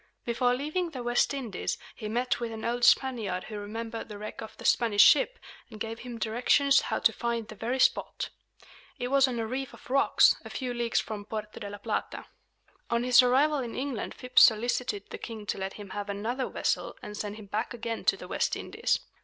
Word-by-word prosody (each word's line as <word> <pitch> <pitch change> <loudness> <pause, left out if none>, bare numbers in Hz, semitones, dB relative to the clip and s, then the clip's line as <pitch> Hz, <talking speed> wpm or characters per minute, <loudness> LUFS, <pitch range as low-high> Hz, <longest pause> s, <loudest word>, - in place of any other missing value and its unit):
Before 245 +1 +2
leaving 310 +7 -2
the 260 -6 -6
West 240 0 +2
Indies, 245 -9 -3 0.2
he 215 - -6
met 245 +3 0
with 235 -1 -3
an 220 -1 -6
old 240 +1 -1
Spaniard 220 -11 +3
who 215 -1 -6
remembered 225 +3 -6
the 210 - -7
wreck 210 +1 -7
of 220 - -9
the - - -10
Spanish 220 -4 +5
ship, 475 - +5 0.3
and 215 - -11
gave 225 +1 -4
him 245 -1 -7
directions 245 +5 +3
how - - -2
to - - +3
find 235 -2 -2
the - - -9
very 230 +5 -2
spot. - - +1 0.7
It 245 - -3
was 275 0 +5
on 250 -2 -3
a 225 - -1
reef 260 +3 -4
of - - -14
rocks, 275 +1 +5
a - - -9
few 255 -2 -3
leagues 240 -1 0
from 210 -2 -5
Porto 215 0 -6
de 205 - -6
la 205 - -7
Plata. 205 - -3 0.6
On 235 0 +1
his 250 0 +7
arrival 275 +4 +3
in 240 -3 -4
England 265 -4 -3
Phips 250 0 +3
solicited 225 -2 +3
the - - -6
king 220 -3 -7
to 195 - -3
let 190 0 -3
him 205 -2 -10
have 205 0 -5
another 230 +6 -2
vessel - - -1
and 210 - -7
send 205 0 -4
him 215 -1 -10
back 210 +4 -2
again 230 -1 -4
to - - +3
the - - -9
West - - 0
Indies. - - -1
235 Hz, 210 wpm, -29 LUFS, 215-250 Hz, 0.7 s, his